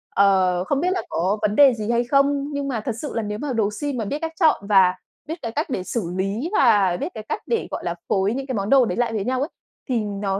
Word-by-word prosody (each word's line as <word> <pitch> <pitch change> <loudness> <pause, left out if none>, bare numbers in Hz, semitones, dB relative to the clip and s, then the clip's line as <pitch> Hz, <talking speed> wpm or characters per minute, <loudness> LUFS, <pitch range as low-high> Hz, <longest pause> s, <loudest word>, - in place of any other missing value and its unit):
ờ, 185 -3 +3
không 275 +8 0
biết 360 - +1
là 370 - 0
có 190 +5 0
vấn 210 -1 0
đề 275 -1 +7
gì 220 0 -3
hay 235 0 +2
không." 280 +2 +1
Nhưng 285 -1 -2
mà 245 -5 -2
thật 230 0 -3
sự 295 - -5
là 230 - 0
nếu 210 -1 -4
mà 285 0 -3
đồ 220 -3 +1
si 290 -1 -1
mà 235 -4 -3
biết 285 +9 -3
cách 325 0 -4
chọn 310 - +3
và 190 -3 +5 0.3
biết 320 - -3
cái 230 - -4
cách 300 +7 -2
để 195 -8 -2
xử 185 -3 -3
lý 205 - -2
và 205 -9 +4
biết 360 - -3
cái 215 - -7
cách - - -2
để, 460 -2 -1
gọi - - -4
là, 170 - -2
phối 195 +2 +1
những 270 +2 -4
cái 260 - -3
món 200 0 -2
đồ 265 -2 +6
đấy - - -3
lại 240 -2 0
với 205 -3 -2
nhau 255 0 0
ấy, 290 - -1 0.4
thì 240 -3 +1
nó 200 -1 -2
230 Hz, 285 wpm, -22 LUFS, 200-275 Hz, 0.4 s, đề